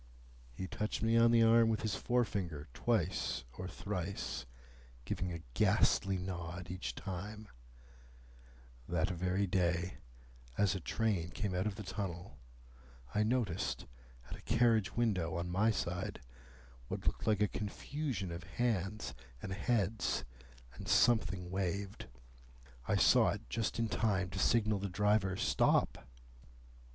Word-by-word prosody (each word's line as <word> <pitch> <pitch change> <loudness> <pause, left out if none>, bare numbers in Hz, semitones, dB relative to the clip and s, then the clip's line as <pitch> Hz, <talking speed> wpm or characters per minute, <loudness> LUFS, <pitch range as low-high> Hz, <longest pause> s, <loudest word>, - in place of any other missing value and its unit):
He 75 +10 -5
touched 105 +3 -3
me 115 +1 +3
on 115 0 +6
the 115 -1 +6
arm 115 0 +6
with 110 - 0
his 110 -2 0
forefinger 100 -13 -1
twice 95 - 0
or 90 - -5
thrice 85 -11 -4 0.6
giving 90 0 -2
a 85 -1 -6
ghastly 95 +8 +3
nod 90 -1 -5
each 90 0 -4
time:— 105 +3 -6 1.4
"That 85 +1 +1
very 90 +3 0
day, 90 -1 0 0.6
as 100 -3 +3
a 95 - -3
train 95 -2 0
came 100 +1 -3
out 90 +3 0
of 105 - -2
the 105 - -6
tunnel, 90 -5 -5 0.7
I 105 - +2
noticed, 110 -5 0 0.4
at - - -6
a - - -13
carriage 115 -4 +3
window 95 -7 +1
on 90 +1 -3
my 105 +5 +3
side, 90 -4 -2 0.7
what - - -5
looked - - -1
like 105 -2 +3
a - - +4
confusion 110 - -3
of 85 +1 -5
hands 95 - -1 0.3
and 95 - -5
heads, 110 +1 0 0.5
and - - -9
something 95 -7 +3
waved. 95 +1 -2 0.8
I - - +2
saw - - +6
it - - -8
just 115 - -1
in 115 0 +1
time 100 -5 0
to 95 - -4
signal 110 -1 +3
the 100 0 -3
driver, 105 0 +2
Stop! 60 - +2
95 Hz, 135 wpm, -35 LUFS, 90-110 Hz, 1.4 s, on